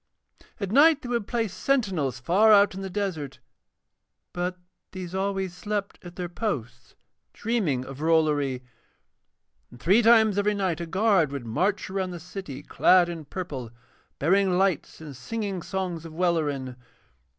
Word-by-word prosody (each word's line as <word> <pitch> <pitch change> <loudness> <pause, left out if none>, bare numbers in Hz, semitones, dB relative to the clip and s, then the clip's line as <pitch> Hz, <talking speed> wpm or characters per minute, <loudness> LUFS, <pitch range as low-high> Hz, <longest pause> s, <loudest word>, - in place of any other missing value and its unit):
At 200 -3 -3
night 300 +4 +5
they 245 - -6
would 235 -4 -1
place 230 -5 -1
sentinels 185 - 0
far 190 - +4
out 200 -1 +6
in 190 - -6
the 195 - -5
desert, 175 -9 -3 1.0
but 180 +1 -3 0.4
these 185 -2 -7
always 190 -1 -2
slept 205 +1 -4
at 175 -1 -11
their 180 -1 -4
posts 125 - -5 0.4
dreaming 185 - -1
of 135 +1 -9
Rollory, 150 -5 +1 1.1
and 120 - -15
three 195 - +4
times 220 -3 +5
every 210 +1 +1
night 185 -5 -1
a 170 - -4
guard 190 -4 +2
would 140 -4 -5
march 185 - 0
around 190 -1 -2
the 175 -1 -7
city 170 -5 -8
clad 180 +2 +4
in 165 -3 -6
purple, 140 -7 -6 0.5
bearing 185 +4 +2
lights 190 -4 0
and 150 -4 -9
singing 200 - -4
songs 180 -3 -4
of 165 -1 -10
Welleran. 150 -7 -1
180 Hz, 150 wpm, -26 LUFS, 155-200 Hz, 1.1 s, out